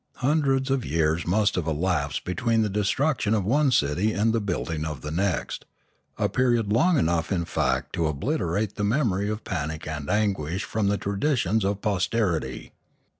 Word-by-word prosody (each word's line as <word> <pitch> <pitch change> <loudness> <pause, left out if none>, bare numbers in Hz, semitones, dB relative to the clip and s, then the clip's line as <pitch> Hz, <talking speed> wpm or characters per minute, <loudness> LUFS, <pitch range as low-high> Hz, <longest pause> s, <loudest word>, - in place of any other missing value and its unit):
Hundreds 135 -1 +1
of 135 -2 +1
years 80 -1 0
must 105 +3 +2
have 85 -3 -2
elapsed 80 -2 -1
between 115 +4 +1
the 105 - -1
destruction 110 +3 +1
of 100 -4 0
one 140 +6 +3
city 95 - +1
and 110 +2 +1
the 115 - +1
building 85 -5 -2
of 75 -5 -5
the 75 - -5
next, 90 +1 -1 0.5
a - - +1
period 120 -5 +1
long 170 +8 +4
enough 85 -6 +1
in 85 -3 0
fact - - -1
to 85 -2 0
obliterate 100 - -1
the 105 - -1
memory 105 -3 +1
of 110 +1 -4
panic 80 -1 -4
and 75 -2 -5
anguish 95 -4 0
from 110 -2 -1
the 100 0 +2
traditions 105 - 0
of 100 +1 -1
posterity. 95 - -1
100 Hz, 170 wpm, -25 LUFS, 85-115 Hz, 0.5 s, long